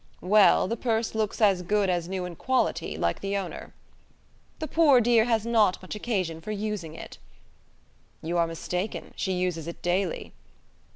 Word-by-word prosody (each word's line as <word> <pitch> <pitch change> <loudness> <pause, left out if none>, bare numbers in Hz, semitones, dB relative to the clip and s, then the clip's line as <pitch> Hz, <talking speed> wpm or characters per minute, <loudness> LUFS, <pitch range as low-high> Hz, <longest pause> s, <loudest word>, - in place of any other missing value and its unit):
"Well, 205 +1 +5
the 230 - -1
purse 225 -1 -1
looks 220 -2 -2
as 195 -4 +4
good 205 +2 +1
as 175 -2 -1
new 185 -1 -3
in 180 -1 -7
quality, 260 +8 -1
like - - 0
the 200 0 -1
owner." 190 -3 -6 0.9
"The 315 - -4
poor 295 -4 +5
dear 235 -1 +4
has 225 -2 +1
not 220 -5 +3
much 185 - -8
occasion 190 -7 -2
for 185 - -9
using 205 -6 -4
it." - - -10 1.0
"You 165 +2 -2
are 170 - +3
mistaken: 180 +4 -4
she 190 - -2
uses 180 -3 -2
it 170 - -8
daily." 180 0 -1
200 Hz, 165 wpm, -27 LUFS, 180-220 Hz, 1.0 s, Well